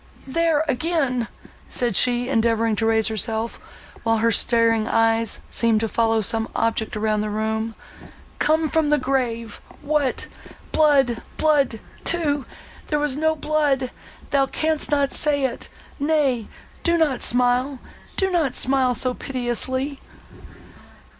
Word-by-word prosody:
there 320 +2 +1
again!" 270 -4 0 0.4
said 240 -5 +1
she, 245 +2 +2
endeavouring 230 -3 +1
to 225 +2 0
raise 220 -1 +2
herself, 220 +1 -2 0.4
while 225 -1 +1
her 230 +1 +2
starting 230 0 +3
eyes 225 -1 +1
seemed 230 -2 +2
to 225 - -1
follow 225 0 +1
some 225 +2 0
object 225 -1 -1
round 215 0 0
the 210 - -3
room—"Come 220 +8 -3
from 310 0 +1
the 295 - +4
grave! 245 -5 -2 0.2
What! 290 -3 0 0.5
Blood—blood 280 -2 +1 0.2
too!—There 300 -1 -2
was 295 -2 0
no 315 +2 +1
blood—thou 280 -2 -1
canst 315 +2 0
not 285 -2 +1
say 290 -2 +4
it!—Nay, 275 -1 -2 0.3
do 340 0 +2
not 295 -6 +1
smile,—do 250 - 0
not 320 -7 0
smile 260 -1 +2
so 255 +1 +1
piteously!" 260 +2 -1
255 Hz, 115 wpm, -22 LUFS, 225-295 Hz, 0.5 s, the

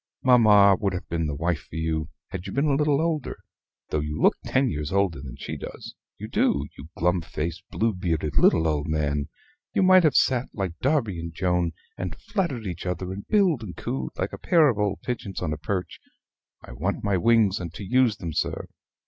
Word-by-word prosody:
Mamma 105 -6 +6
would 100 -2 0
have 90 - -5
been 80 -1 -1
the 75 - -3
wife 85 +1 -2
for - - -10
you, 80 -1 -2 0.2
had 90 - -6
you - - -6
been 140 +2 +1
a 145 - +2
little 145 0 +2
older, 160 -4 -1 0.5
though 75 - 0
you 75 +1 -3
look - - +4
ten 135 0 +1
years 75 - -3
older 95 -7 +1
than 65 -4 -8
she - - -5
does - - -8 0.2
you - - -7
do, 70 0 +1
you 75 +4 -11
glum 90 +1 +2
faced, 80 +1 -4
blue 115 0 0
bearded 80 -6 -2
little 80 0 +4
old 75 -1 -1
man! 75 -2 -1 0.5
You 195 - +3
might 185 0 +7
have 150 -5 +3
sat, 130 0 +2
like 95 -5 -3
Darby 125 - +1
and 85 0 -5
Joan, 90 -1 0 0.3
and 90 -2 -4
flattered 175 - -2
each 90 -1 -5
other; 90 +1 -3
and 100 +1 -8
billed 190 - +3
and 100 -5 -8
cooed 65 -1 -4
like - - -2
a - - -7
pair 160 -4 +4
of 110 -5 -1
old 105 -1 -1
pigeons 110 -6 -4
on 80 -4 -2
a - - -4
perch. 90 +4 -4 0.6
I - - -11
want 80 +11 -3
my 100 -2 +1
wings 110 -1 +3
and 85 -3 -5
to - - -7
use 120 0 +2
them, 85 -4 -5
sir." - - -2
95 Hz, 210 wpm, -25 LUFS, 80-120 Hz, 0.6 s, might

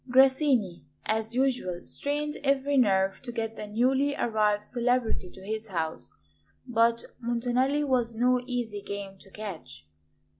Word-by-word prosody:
Grassini, 260 - +4 0.2
as 220 +1 -1
usual, 250 -10 0
strained 295 +1 -1
every 275 0 +2
nerve 195 -6 +3
to 250 - -6
get 225 -1 -3
the 210 - -6
newly 265 +6 +2
arrived 210 -2 +1
celebrity 245 -5 0
to 190 +1 -13
his 220 +1 -3
house; 160 - -3 0.5
but 230 -1 +2 0.2
Montanelli 245 +4 +1
was 245 -5 +1
no 250 +2 +3
easy 235 -5 -3
game 200 -1 -6
to 195 - -16
catch. 165 - -8
235 Hz, 135 wpm, -28 LUFS, 205-255 Hz, 0.5 s, Grassini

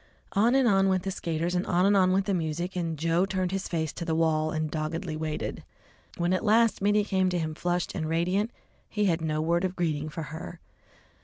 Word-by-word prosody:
On 225 +5 +3
and 265 -2 +4
on 195 -2 +4
went 185 -1 +1
the 195 - -2
skaters, 170 -1 -2
and 180 0 +1
on 180 +1 +3
and 200 +1 +4
on 185 -1 +4
went 190 +1 +2
the 200 - 0
music, 170 +1 -2
and 165 -3 -2
Joe 165 +3 +2
turned 185 -2 -1
his 195 0 -2
face 160 -3 -2
to - - -5
the 165 -1 -1
wall 160 -1 +2
and 155 -1 -2
doggedly 160 +2 -3
waited. 155 -1 -4 0.5
When 175 +1 +1
at 185 - 0
last 225 0 +3
Mittie 205 +1 +3
came 190 -2 +1
to 180 - -1
him 160 -2 -2
flushed 175 +2 -1
and 155 - -3
radiant, 180 +6 +1 0.4
he 210 -1 0
had 170 -3 +1
no 155 -1 -1
word 170 +2 +1
of 185 0 -1
greeting 155 -4 -1
for 155 +1 -5
her. 165 +1 -7
175 Hz, 225 wpm, -27 LUFS, 160-190 Hz, 0.5 s, and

